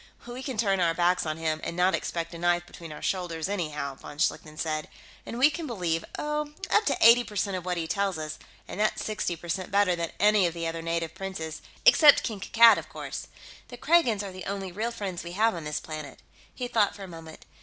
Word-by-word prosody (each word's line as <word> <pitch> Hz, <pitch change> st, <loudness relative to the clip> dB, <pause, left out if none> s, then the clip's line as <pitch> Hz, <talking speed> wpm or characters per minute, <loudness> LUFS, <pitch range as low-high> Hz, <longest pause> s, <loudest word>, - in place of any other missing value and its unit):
"We 240 Hz, +2 st, -7 dB
can 265 Hz, -3 st, -5 dB
turn 195 Hz, -3 st, +2 dB
our 165 Hz, -2 st, +2 dB
backs 175 Hz, 0 st, +2 dB
on 155 Hz, 0 st, -2 dB
him 160 Hz, -1 st, -2 dB
and 170 Hz, -, -4 dB
not 180 Hz, +1 st, +3 dB
expect 170 Hz, 0 st, -3 dB
a 170 Hz, -, -8 dB
knife 175 Hz, 0 st, +1 dB
between 165 Hz, -2 st, -11 dB
our 150 Hz, -, -9 dB
shoulders, 175 Hz, -4 st, -2 dB
anyhow," 150 Hz, -8 st, -3 dB
von 145 Hz, +2 st, -11 dB
Schlichten 155 Hz, 0 st, -1 dB
said. 155 Hz, -1 st, -2 dB, 0.4 s
"And 235 Hz, -, -5 dB
we 275 Hz, +5 st, +5 dB
can 330 Hz, 0 st, -5 dB
believe, 175 Hz, -8 st, -1 dB
oh, 300 Hz, 0 st, -2 dB, 0.2 s
up 425 Hz, -, +4 dB
to -, -, +2 dB
eighty 235 Hz, +2 st, +8 dB
percent 205 Hz, -3 st, -2 dB
of 180 Hz, -1 st, -5 dB
what 180 Hz, -1 st, -1 dB
he 165 Hz, -, -2 dB
tells 195 Hz, +1 st, -1 dB
us, 155 Hz, -1 st, -5 dB, 0.3 s
and -, -, -7 dB
that's 215 Hz, 0 st, 0 dB
sixty 210 Hz, -5 st, -2 dB
percent 175 Hz, +3 st, -4 dB
better 200 Hz, -2 st, +3 dB
than 170 Hz, -1 st, -3 dB
any 210 Hz, -3 st, +5 dB
of 170 Hz, -, -5 dB
the 170 Hz, 0 st, -3 dB
other 165 Hz, 0 st, -3 dB
native 165 Hz, -1 st, -2 dB
princes, 160 Hz, -5 st, -6 dB, 0.2 s
except 295 Hz, -3 st, +8 dB
King 220 Hz, -4 st, -3 dB
Kankad, 230 Hz, +4 st, +6 dB
of -, -, -11 dB
course. -, -, -6 dB, 0.4 s
The -, -, -10 dB
Kragans 250 Hz, -12 st, +3 dB
are 195 Hz, -, -6 dB
the 185 Hz, 0 st, -9 dB
only 195 Hz, -1 st, -4 dB
real 215 Hz, +6 st, -2 dB
friends 195 Hz, -6 st, -5 dB
we 170 Hz, 0 st, -7 dB
have 220 Hz, +4 st, +3 dB
on 170 Hz, -3 st, -6 dB
this 150 Hz, 0 st, -2 dB
planet." 155 Hz, -2 st, -8 dB, 0.3 s
He 250 Hz, -, -5 dB
thought 220 Hz, -4 st, +2 dB
for 200 Hz, -, -9 dB
a -, -, -7 dB
moment. 165 Hz, -2 st, -11 dB
180 Hz, 230 wpm, -27 LUFS, 165-210 Hz, 0.4 s, eighty